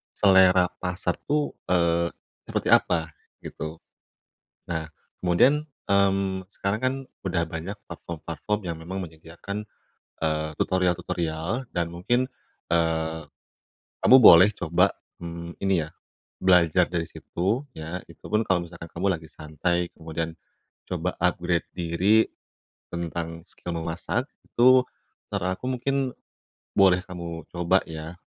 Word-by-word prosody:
selera 95 Hz, -2 st, +6 dB
pasar 90 Hz, +1 st, -1 dB
tuh, 150 Hz, 0 st, +1 dB, 0.2 s
eee, 85 Hz, -1 st, +2 dB, 0.4 s
seperti -, -, -1 dB
apa, 80 Hz, -2 st, +4 dB, 0.3 s
gitu. 80 Hz, +1 st, -7 dB, 0.9 s
Nah, 80 Hz, -2 st, -2 dB, 0.4 s
kemudian, 135 Hz, -, +4 dB, 0.2 s
mmm, 95 Hz, -1 st, +2 dB
sekarang 100 Hz, +2 st, -1 dB
kan 130 Hz, +1 st, +2 dB, 0.3 s
udah 90 Hz, -3 st, 0 dB
banyak 85 Hz, +5 st, -5 dB
platform-platform 85 Hz, +4 st, -4 dB
yang 85 Hz, -, -3 dB
memang 95 Hz, +4 st, -5 dB
menyediakan, 85 Hz, +5 st, -7 dB, 0.6 s
eee, 80 Hz, 0 st, 0 dB
tutorial-tutorial 90 Hz, +4 st, -1 dB
dan 85 Hz, -1 st, 0 dB
mungkin, 120 Hz, +9 st, +1 dB, 0.5 s
eee, 80 Hz, -1 st, +1 dB, 0.8 s
kamu 130 Hz, -, +9 dB
boleh 90 Hz, -2 st, +10 dB
coba, 90 Hz, +3 st, +2 dB, 0.3 s
mmm, 85 Hz, 0 st, -7 dB
ini 95 Hz, -4 st, +2 dB
ya, -, -, -12 dB, 0.5 s
belajar 90 Hz, -1 st, +5 dB
dari 85 Hz, -2 st, -1 dB
situ, 100 Hz, +10 st, -2 dB
ya, 80 Hz, +3 st, -5 dB
itupun 105 Hz, +1 st, -1 dB
kalau 90 Hz, -4 st, +1 dB
misalkan 85 Hz, -1 st, -10 dB
kamu 90 Hz, +4 st, -1 dB
lagi 80 Hz, -1 st, -14 dB
santai, 85 Hz, +3 st, -1 dB
kemudian 80 Hz, 0 st, -4 dB, 0.6 s
coba -, -, -1 dB
upgrade 85 Hz, -1 st, +1 dB
diri 90 Hz, +6 st, +3 dB, 0.7 s
tentang 85 Hz, -1 st, -4 dB
skill 85 Hz, -1 st, -6 dB
memasak, 90 Hz, -, -2 dB, 0.2 s
itu 125 Hz, +1 st, +5 dB, 0.5 s
saran 95 Hz, -2 st, -1 dB
aku -, -, -6 dB
mungkin 135 Hz, 0 st, 0 dB, 0.6 s
boleh 95 Hz, -2 st, +6 dB
kamu 85 Hz, -3 st, -6 dB
coba 90 Hz, +2 st, +3 dB
ya, 80 Hz, +1 st, -7 dB
90 Hz, 115 wpm, -26 LUFS, 85-95 Hz, 0.9 s, boleh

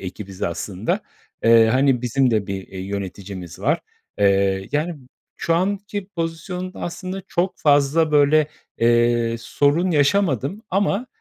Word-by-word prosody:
ekibiz 95 Hz, 0 st, -8 dB
aslında. 90 Hz, +4 st, -2 dB, 0.4 s
Eee, 115 Hz, 0 st, +7 dB
hani, 130 Hz, +1 st, +2 dB
bizim 125 Hz, +2 st, +2 dB
de 110 Hz, -3 st, 0 dB
bir, 95 Hz, -1 st, -5 dB
eee, 95 Hz, -, -8 dB
yöneticimiz 95 Hz, -2 st, -6 dB
var, -, -, +1 dB, 0.4 s
eee, 100 Hz, -1 st, +2 dB
yani, 160 Hz, +4 st, 0 dB, 0.4 s
şu 165 Hz, -, 0 dB
anki 200 Hz, +2 st, -2 dB
pozisyonda 180 Hz, +1 st, -5 dB
aslında 185 Hz, +2 st, -5 dB
çok 180 Hz, +2 st, -1 dB
fazla, 145 Hz, +2 st, +3 dB
böyle, 150 Hz, +1 st, +5 dB, 0.3 s
eee, 120 Hz, 0 st, +3 dB
sorun 145 Hz, +9 st, +1 dB
yaşamadım. 160 Hz, -, +1 dB
Ama, 200 Hz, +5 st, +1 dB
140 Hz, 125 wpm, -22 LUFS, 105-175 Hz, 0.4 s, Eee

